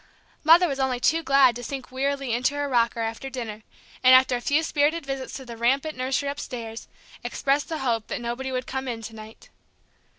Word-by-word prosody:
Mother 335 +3 +7
was 275 -3 -3
only 260 -2 0
too 325 +6 +2
glad 275 -5 +4
to 245 - -7
sink 265 +1 -6
wearily 275 -1 -1
into 250 +4 +1
her 290 0 -1
rocker 235 -3 +1
after 225 +4 -4
dinner, 230 -5 -6 0.4
and, 255 0 +8
after 260 -1 +5
a 245 - -3
few 295 +5 +2
spirited 305 +1 +1
visits 270 -1 -5
to 265 - -7
the 235 -1 -8
rampant 270 +7 +1
nursery 260 +2 -1
upstairs, 235 -5 -6 0.4
express 275 +1 0
the 320 - -5
hope 230 -5 -1
that - - -3
nobody 240 +3 -4
would 255 -1 -2
come 265 0 -4
in 230 -2 -4
to 225 - -7
night. 220 0 -12
260 Hz, 200 wpm, -25 LUFS, 235-280 Hz, 0.4 s, and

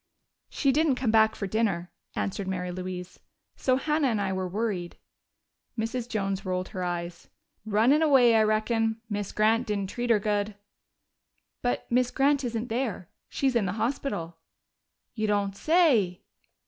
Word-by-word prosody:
"She 275 - +1
didn't 300 0 +2
come 250 -3 0
back 220 0 +4
for 200 - -4
dinner," 195 -4 -1 0.2
answered 200 0 -2
Mary 180 -1 -3
Louise. 180 0 -6 0.4
"So 255 - +1
Hannah 300 +2 +1
and 225 -4 0
I 195 -1 -1
were 190 0 -2
worried." 190 -3 -3 0.8
Mrs. 230 +2 -3
Jones 195 -3 -2
rolled 185 -1 -2
her 185 -2 -4
eyes. 175 -1 -4 0.4
"Runned 230 +9 +4
away, 265 -7 +5
I 220 - +5
reckon. 220 +1 +1
Miz 205 -1 -2
Grant 225 +3 +2
didn't 200 -2 -2
treat 240 0 -3
her 230 - +6
good." 205 0 -1 1.1
"But 245 - -1
Miss 250 0 +3
Grant 280 +2 +2
isn't 235 -1 -3
there 225 -7 -2 0.2
she's 265 -2 0
in 215 -5 +2
the 180 - -2
hospital." 220 -7 -3 0.8
"You 215 -2 -1
don't 200 -1 0
say!" 245 - +3
215 Hz, 150 wpm, -27 LUFS, 190-245 Hz, 1.1 s, her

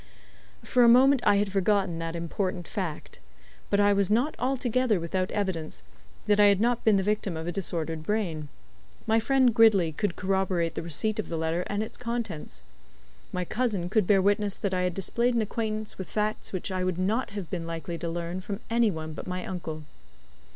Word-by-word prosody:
For 250 - +3
a - - +7
moment 265 +2 +6
I - - +6
had 200 0 +1
forgotten 195 -3 +1
that 165 0 -4
important 175 +1 -3
fact. 180 - -5 0.5
But 200 - +2
I 205 0 +5
was 200 -2 +2
not 245 +8 +2
altogether 255 -4 +1
without 185 +3 -2
evidence 170 - -3 0.4
that 205 0 +3
I 205 - +8
had 200 -1 +5
not 240 +2 +1
been 220 -2 +5
the 195 - +2
victim 205 -4 -1
of 160 - -5
a 175 - -2
disordered 165 -4 -3
brain. 165 -5 -2 0.6
My 225 +1 +3
friend 255 +1 +3
Gridley 210 -7 +5
could 180 +3 -2
corroborate 185 -3 0
the - - -4
receipt 170 +7 -2
of 215 - -3
the 165 - -2
letter 160 +2 0
and 205 +1 -1
its 220 - -8
contents. 230 - -5 0.7
My 180 0 -2
cousin 210 -6 -1
could 215 -5 +2
bear 195 -2 +4
witness 205 0 +1
that 200 -2 -2
I 180 - +1
had 180 -1 -1
displayed 235 +5 0
an 230 - +2
acquaintance 215 -1 -3
with 190 - -6
facts 215 0 -2
which 185 0 -4
I 185 -1 -1
would 185 -2 -1
not 210 +7 0
have 185 -5 -6
been 170 -3 -3
likely 165 0 -5
to 170 - -3
learn 170 +2 -4
from 200 +1 -5
any 230 -1 +4
one 160 -3 -5
but - - -8
my 180 0 -4
uncle. 160 -4 -5
195 Hz, 200 wpm, -27 LUFS, 170-215 Hz, 0.7 s, I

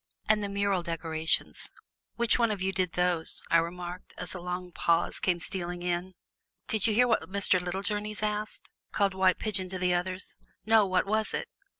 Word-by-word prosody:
"And 215 -1 +3
the 200 - -2
mural 200 -2 +1
decorations 160 -2 0 0.5
which 235 +1 +3
one 230 -1 +4
of 210 -2 -2
you 190 +1 0
did 185 -2 0
those?" 180 -2 +1
I 165 - +7
remarked, 175 +2 -4
as 180 - -5
a 185 - -6
long 180 0 -4
pause 170 0 +1
came 175 -2 +1
stealing 175 -1 -2
in. 180 +1 -2 0.5
"Did 220 0 +2
you 215 - +1
hear 250 +2 +5
what 225 - +1
Mr. 195 -1 +3
Littlejourneys 205 +4 -3
asked?" 210 0 -1 0.2
called 200 -2 +2
White 190 -1 +3
Pigeon 190 -4 -2
to 185 - -4
the 180 0 +1
others. 185 +1 -1 0.3
"No; 220 -2 +5
what 185 -1 +2
was 215 +2 0
it?" - - -4
185 Hz, 185 wpm, -29 LUFS, 175-210 Hz, 0.5 s, I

